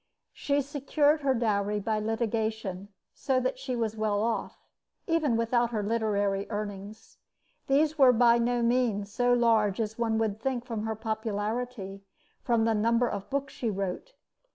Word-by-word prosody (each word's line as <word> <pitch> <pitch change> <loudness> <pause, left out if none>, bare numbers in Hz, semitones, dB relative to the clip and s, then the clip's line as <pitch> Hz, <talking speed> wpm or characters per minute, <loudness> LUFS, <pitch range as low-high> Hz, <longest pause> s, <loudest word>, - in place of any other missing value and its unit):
She 285 0 0
secured 290 +2 +1
her 270 -2 +2
dowry 210 -3 0
by 215 +1 -1
litigation, 220 -3 -2 0.3
so 265 -2 0
that 255 0 -2
she 260 -2 -3
was 225 -2 -2
well 215 -1 0
off, 230 0 -2 0.5
even 310 -8 +1
without 235 +1 +1
her 215 -3 -2
literary 205 -2 0
earnings. 205 0 -7 0.5
These 300 +3 +2
were 260 -2 +8
by 235 0 +4
no 240 0 +1
means 230 -4 +1
so 245 +3 +1
large 225 -4 +3
as 220 0 -3
one 225 -1 +1
would 220 -2 -1
think 250 -1 -2
from 225 -3 -4
her 220 - -2
popularity 220 +1 -3
and 195 0 -10 0.4
from 235 -3 +1
the 225 - +2
number 230 +3 +2
of 200 -3 -5
books 275 0 -2
she 235 - -2
wrote. 200 - -4
225 Hz, 160 wpm, -28 LUFS, 210-250 Hz, 0.5 s, were